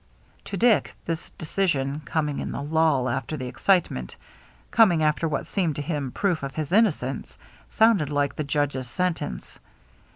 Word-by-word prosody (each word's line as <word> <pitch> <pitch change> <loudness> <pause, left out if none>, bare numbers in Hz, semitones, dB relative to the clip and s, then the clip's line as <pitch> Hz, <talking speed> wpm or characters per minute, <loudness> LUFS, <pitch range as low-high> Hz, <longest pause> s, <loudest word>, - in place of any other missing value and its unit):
To 200 - -4
Dick 230 +2 +3
this 165 0 -3
decision, 150 -5 -1
coming 150 -3 -1
in - - -4
the - - -4
lull 155 -4 +2
after 130 +4 -2
the 130 - -5
excitement, 125 - 0 0.6
coming 185 -8 +5
after 150 +2 +1
what 150 - -2
seemed 170 -7 -1
to 145 - -3
him 145 -5 -3
proof 180 0 0
of 135 -1 -5
his 155 -1 -3
innocence, 180 - +1 0.3
sounded 220 -10 +3
like 145 -1 0
the 155 - -2
judge's 140 -3 -1
sentence. 165 - -3
150 Hz, 155 wpm, -25 LUFS, 140-175 Hz, 0.6 s, coming